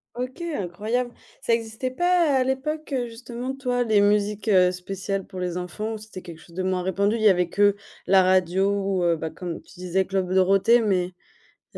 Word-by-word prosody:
OK, 255 +7 -5
incroyable. 240 - -2 0.3
Ça 230 - +1
existait 230 +3 -2
pas 345 -2 +2
à - - +3
l'époque 285 +4 -3
justement 240 +3 -6
toi, 250 -2 0
les 215 -3 +3
musiques, 205 0 +1
heu, 180 -2 +5
spéciales 195 +1 -4
pour 185 - -9
les 180 -1 -2
enfants, 210 +5 -4
c'était 215 -3 -10
quelque 170 -3 -10
chose 170 +1 -17
de 185 - -2
moins 185 -1 0
répandu. 200 +4 +1
Il 225 - -3
y 215 - +6
avait 180 -2 +2
que 205 0 +3 0.3
la 190 -1 +6
radio 185 +1 +2
ou, 195 -2 0
heu, 170 -1 +3
bah, 160 - -4
comme 175 0 -6
tu - - -18
disais, 185 +1 0
Club 190 -1 -1
Dorothée, 195 +5 +4
mais 185 -4 +1 0.7
il - - -12
200 Hz, 195 wpm, -24 LUFS, 185-235 Hz, 0.7 s, y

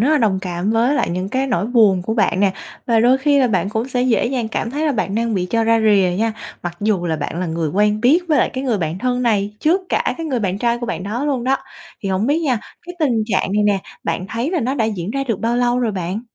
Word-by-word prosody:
rất 245 - +3
là 310 - +4
đồng 210 -5 +2
cảm 180 +2 -2
với 230 +5 +2
lại - - 0
những 185 +2 -2
cái 260 +4 -1
nỗi 235 -5 0
buồn 215 -7 +4
của 220 +5 -2
bạn 200 -4 +1
nè. 195 -2 +3 0.3
Và 230 -2 +3
đôi 250 +3 +4
khi 285 +1 +3
là 265 - +4
bạn 195 -2 0
cũng 220 +4 -2
sẽ 250 -1 0
dễ 250 -3 +2
dàng 240 -3 -2
cảm 225 - -3
thấy 300 +4 -1
là 295 - +2
bạn 205 -5 -2
đang 230 0 0
bị 180 -1 -1
cho 230 -1 +2
ra 225 0 +3
rìa 205 -4 +4
nha, 225 0 +1 0.3
mặc 175 -1 -5
dù 205 -4 0
là 160 - 0
bạn 155 +3 -4
là 185 - -1
người 160 -1 -2
quen 210 +4 +1
biết 265 +9 +5
với 305 - +3
lại - - +2
cái 260 +1 -4
người 235 -6 0
bạn 160 +1 -2
thân 250 +3 -1
này 210 -3 0
trước 340 +5 +3
cả - - 0
cái 330 - -5
người 260 -6 -1
bạn 195 -1 -1
trai 235 +1 +1
của 240 - -4
bạn 175 -5 -3
đó 220 +8 -3
luôn 270 -5 -1
đó. 270 +1 +2 0.5
Thì 195 - -2
hổng 190 +3 0
biết 290 +4 +2
nha, 260 -7 +1 0.3
cái 355 - -7
tình 290 -7 +2
trạng 195 -3 0
này 210 +1 +2
nè, 205 -1 +2 0.3
bạn 170 +2 -2
thấy 235 - -2
là 355 -3 0
nó 255 +2 -1
đã 230 -6 +1
diễn 200 -4 -3
ra 275 +3 -2
được 230 -7 -2
bao 235 +1 0
lâu 245 0 +2
rồi 235 -3 0
bạn? 185 +2 -3
225 Hz, 290 wpm, -19 LUFS, 195-255 Hz, 0.5 s, biết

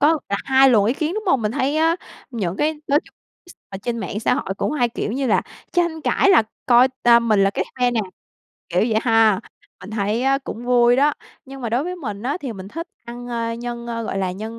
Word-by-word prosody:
có 310 +2 +4
là 200 - 0
hai 265 0 +5
luồng 215 -5 +4
ý 235 - +1
kiến, 315 +4 -2
đúng 430 0 -4
hông? 270 -10 +2
Mình 210 +1 -1
thấy 275 +5 0
á, 325 +2 +3 0.3
những 195 -7 -3
cái 310 +1 +1
nói 290 +1 +3
chung - - -21 0.3
x 350 - -13 0.2
ở 195 - -7
trên 235 +1 -2
mạng 210 -1 -4
xã - - +2
hội 195 - -3
cũng - - -1
hay 245 -5 +1
kiểu 225 -1 -4
như 270 +1 -1
là 230 - +2 0.3
tranh 340 -2 0
cãi 395 +5 +2
là 335 - +6 0.2
coi, 245 +1 +6
ờ, 235 0 +6
mình 215 -4 +2
là 195 - +3
cái - - -2 0.2
phe 245 0 +3
nè, 235 - 0 0.7
kiểu 180 +1 +1
vậy 220 -1 +2
ha. 225 -3 +4 0.4
Mình 195 - -10
thấy 215 +2 -1
á 270 +1 +2
cũng 245 -3 -8
vui 245 0 +4
đó, 290 +2 +4 0.3
nhưng 270 0 -10
mà 235 - -3
đối 245 +6 0
với 360 +1 -4
mình 210 - -6
á, 270 +6 -1
thì 260 -5 -4
mình 190 -1 -9
thích 330 - -6 0.2
ăn, 240 +1 -8
a, 230 -1 -2
nhân, 235 0 -6
a, 235 - -4
ờ, 230 - -3
gọi 195 - -3
là 185 -1 -1
nhân 220 +4 -7
240 Hz, 255 wpm, -21 LUFS, 220-275 Hz, 0.7 s, là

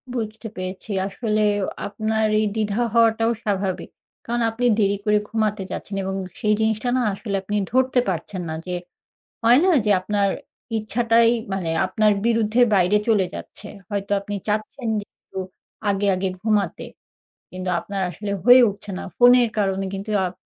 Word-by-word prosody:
বুঝতে 225 0 -4
পেরেছি। 185 +3 -6 0.2
আসলে 215 +1 -1 0.5
আপনার 220 +2 -1
এই 215 - +2
দ্বিধা 215 +1 0
হওয়াটাও 225 0 +3
স্বাভাবিক। 195 -3 -2 0.4
কারণ 240 +1 -1
আপনি 245 +2 -2
দেরি 200 0 +2
করে 210 0 +4
ঘুমাতে 215 -3 -1
যাচ্ছেন 200 - -5
এবং 190 0 -3 0.2
সেই 210 0 +2
জিনিসটা 220 +2 0
না - - +1
আসলে 200 0 -4
আপনি 205 +2 -3 0.2
ধরতে 260 0 +3
পারছেন 180 +2 -4
না 160 - -3
যে, 180 - -2 0.7
হয় 240 +3 +6
না 380 - +4
যে, 210 - +1
আপনার 200 +1 0 0.5
ইচ্ছাটাই 230 +1 +3 0.2
মানে 185 -4 -2 0.2
আপনার 210 +2 +2
বিরুদ্ধের 230 +1 +3
বাইরে 185 +2 +4
চলে 205 -4 +3
যাচ্ছে। 210 - -9 0.2
হয়তো 200 0 -3
আপনি 205 +1 -6
চাচ্ছেন 215 +4 -2
যে - - -9
একটু - - -11 0.5
আগে, 200 +1 0
আগে 190 +1 -1
ঘুমাতে, 210 -3 0 0.7
কিন্তু 185 0 -4
আপনার 200 -1 -5
আসলে 200 +4 -5
হয়ে 250 +2 +8
উঠছে 200 0 -8
না। - - -6
ফোনের 245 -1 +6
কারণে 195 -1 0
কিন্তু 200 +2 -5
আপ 180 - -4
210 Hz, 155 wpm, -22 LUFS, 195-225 Hz, 0.7 s, হয়ে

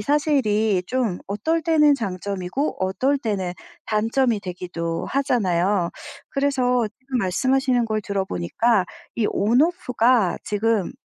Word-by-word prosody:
사실이 220 - +1
좀 245 -8 -1
어떨 270 +12 -1
때는 300 -3 +4
장점이고 200 +3 -3
어떨 265 +9 +1
때는 195 -7 -2 0.3
단점이 225 +1 +1
되기도 175 -3 -4
하잖아요. 195 -9 +1 0.4
그래서 255 -4 +1
지금 260 -1 -3
말씀하시는 255 +5 +1
걸 215 -1 -1
들어보니까 195 - 0 0.3
이 225 - +1
On 230 +6 +2
Off가 250 - +2
지금 210 -2 0
225 Hz, 275 characters per minute, -23 LUFS, 195-265 Hz, 0.4 s, 때는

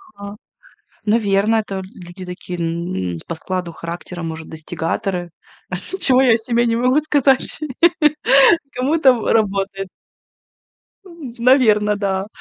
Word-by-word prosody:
Ага. 200 0 -9 0.7
Наверное, 215 0 +2
это 200 -2 -7
л 190 - -5 0.2
люди 180 +1 -10
такие 180 0 -7
н 165 - -3
по 165 - -4
складу 180 0 -4
характера, 170 +1 -7
может, 160 -1 -6
достигаторы, 170 +2 -4 0.7
чего 260 -1 +5
я 250 -4 +5
о - - +3
себе 235 +1 0
не 230 0 +1
могу 250 +5 +3
сказать. 285 -3 +1 1.1
Кому-то 265 +1 +3
в 230 - -2
работает. 195 -2 0 1.2
М. 325 -9 -10
Наверное, 220 -5 +4
да. 195 -1 -2
200 Hz, 120 wpm, -19 LUFS, 175-240 Hz, 1.2 s, чего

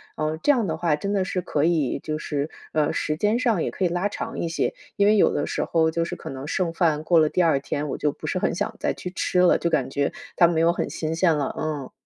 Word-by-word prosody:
嗯， 155 +1 -2
这 290 - +5
样 235 -6 0
的 160 -1 -2
话， 160 -2 +1
真 200 +6 -3
的 195 -2 +1
是 185 0 -2
可 150 -4 0
以 160 -6 +1
就 155 0 -3
是， 150 -1 -3 0.2
呃， 155 -1 +1
时 155 0 -1
间 210 +6 +2
上 230 -9 +1
也 - - -1
可 190 - -4
以 180 - +3
拉 175 +4 0
长 - - -5
一 170 - -1
些， 165 - -1 0.2
因 200 - +3
为 210 +1 +5
有 - - +4
的 145 - 0
时 - - -2
候 160 -1 +2
就 165 +1 0
是 - - -5
可 - - -8
能 135 +2 -7
剩 175 -1 0
饭 160 -3 +1
过 165 0 +4
了 155 - +4
第 180 +4 +1
二 160 -5 +3
天， 145 +1 -3
我 - - -3
就 150 -1 0
不 - - -10
是 185 - -1
很 - - 0
想 210 +4 -2
再 - - 0
去 180 - -7
吃 180 -1 +1
了， 180 - +5
就 170 - -1
感 135 -5 0
觉 140 +1 -1 0.2
它 170 - +7
没 165 -1 +1
有 170 +1 +4
很 - - -2
新 155 0 -3
鲜 165 -1 +3
了。 140 -2 -2
嗯。 150 -4 -4
165 Hz, 305 characters per minute, -24 LUFS, 150-180 Hz, 0.2 s, 它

